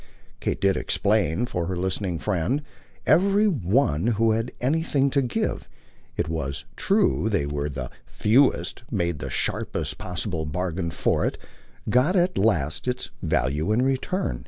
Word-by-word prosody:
Kate - - -2
did 100 -1 +3
explain, 100 -2 +1
for 90 -8 -3
her 90 -1 -2
listening 95 -1 -1
friend; 95 - -1 0.4
every 200 +5 +4
one 105 - +1
who 115 +1 +4
had 115 +2 -1
anything 140 0 +1
to 140 - +3
give 125 -3 -2 0.5
it - - 0
was 70 -5 -3
true 75 +11 +2
they 100 -9 +1
were 70 0 -2
the 65 -3 -5 0.2
fewest 125 +5 +2
made 85 -7 -1
the - - -5
sharpest - - -2
possible 90 -2 -3
bargain 85 +2 -2
for - - 0
it, - - -1 0.5
got 125 - +3
at 180 0 +2
least 80 - +1
its 125 0 -2
value 75 +9 0
in 115 +4 +3
return. 135 +8 -1
100 Hz, 145 wpm, -25 LUFS, 80-130 Hz, 0.5 s, every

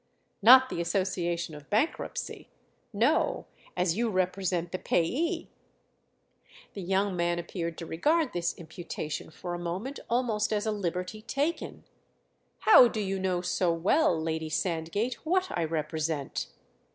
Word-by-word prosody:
"Not 260 +4 +8
the 170 - -2
association 175 -2 -1
of 150 -1 -11
bankruptcy—no; 235 +1 -1 0.3
as 180 -2 +2
you 235 +2 +1
represent 185 -2 -1
the 185 - -3
payee!" 330 - 0 1.3
The 200 - -6
young 190 +1 0
man 175 0 +1
appeared 170 -1 -4
to 165 - -6
regard 300 - +1
this 170 -1 -1
imputation 160 -2 -6
for 175 +2 -6
a 175 - -4
moment 185 +11 -4
almost 230 -4 +1
as 210 0 0
a 220 - +1
liberty 185 +1 -3
taken. 285 +8 -2 0.8
"How 340 - +8
do 225 - -4
you 195 -2 -1
know 185 -2 0
so 180 0 +1
well, 170 - +2
Lady 160 0 -2
Sandgate, 175 +8 -2
what 370 +3 +1
I 170 - 0
represent?" 155 -2 -2
185 Hz, 130 wpm, -29 LUFS, 170-225 Hz, 1.3 s, Not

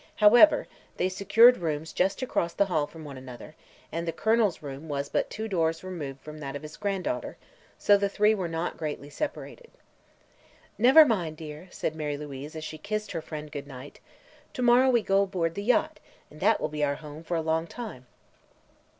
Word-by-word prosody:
However, 240 +8 +6 0.3
they 185 - +1
secured 225 +6 +5
rooms 155 -1 -3
just 195 +7 0
across 170 -9 -1
the 200 - +2
hall 155 -6 0
from 160 -2 -11
one 140 -3 -8
another 130 +3 -11 0.4
and 170 +1 -3
the - - +1
Colonel's 220 -4 +1
room 140 +2 -8
was 140 -1 -3
but - - 0
two 220 +1 -5
doors 165 -4 0
removed 145 -8 -6
from 155 0 -10
that 140 -2 -6
of 145 - -6
his 155 0 -9
granddaughter, 200 +9 -3 0.4
so 205 - +5
the 200 0 0
three 210 +2 +3
were 190 -5 -2
not 165 +1 -3
greatly 150 -2 -5
separated. 385 - -6 1.1
"Never 265 +7 +8
mind, 175 - -1
dear," 155 +2 -9
said 160 - -3
Mary 150 -2 -3
Louise, 145 +1 -8
as 155 - -6
she 155 0 -7
kissed 215 +1 -4
her 165 -3 -3
friend 150 -1 -8
good 145 -1 -6
night; 135 0 -11 0.5
"to 250 - -3
morrow 245 +2 +5
we 240 -3 +3
go 195 0 +3
aboard 180 -4 -1
the 200 - -4
yacht, 280 +7 +1 0.3
and 150 - -14
that - - +3
will - - -1
be 150 0 -3
our 140 -1 +1
home 150 +1 -10
for 170 +1 -2
a - - 0
long 160 +1 0
time." 205 - -8
165 Hz, 195 wpm, -27 LUFS, 150-205 Hz, 1.1 s, Never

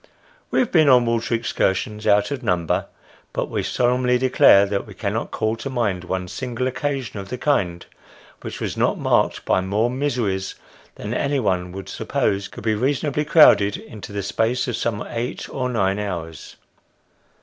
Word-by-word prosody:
We - - -1
have 250 - +2
been 155 -4 +5
on 125 -2 +6
water 115 0 0
ex 115 - -3
cursions 105 +3 -1
out 105 +3 +3
of 140 -3 -3
number, 90 -8 0 0.5
but - - -3
we - - -1
solemnly 125 0 +1
declare 125 -6 +5
that 100 0 -3
we - - -11
cannot - - -2
call 110 +1 -1
to 135 - -5
mind 105 -8 -1
one 90 0 -3
single 125 +4 -4
occasion 130 -4 -3
of 95 - -8
the 125 - -4
kind, 95 -12 0 0.6
which - - -7
was - - -3
not - - +1
marked - - +1
by - - +2
more 105 +6 0
miseries 120 -8 -2 0.4
than 105 +3 -5
any 140 +1 0
one 90 -6 -1
would 95 0 -7
suppose 100 0 -1
could - - -11
be 110 0 +1
reasonably 140 +5 0
crowded 105 -10 +6
into 110 -2 -10
the 100 -1 -3
space 115 +6 0
of 125 - -1
some 110 -3 -2
eight 120 +1 -4
or 125 -1 -2
nine 100 -4 0
hours. 85 -7 -6
110 Hz, 175 wpm, -22 LUFS, 100-125 Hz, 0.6 s, on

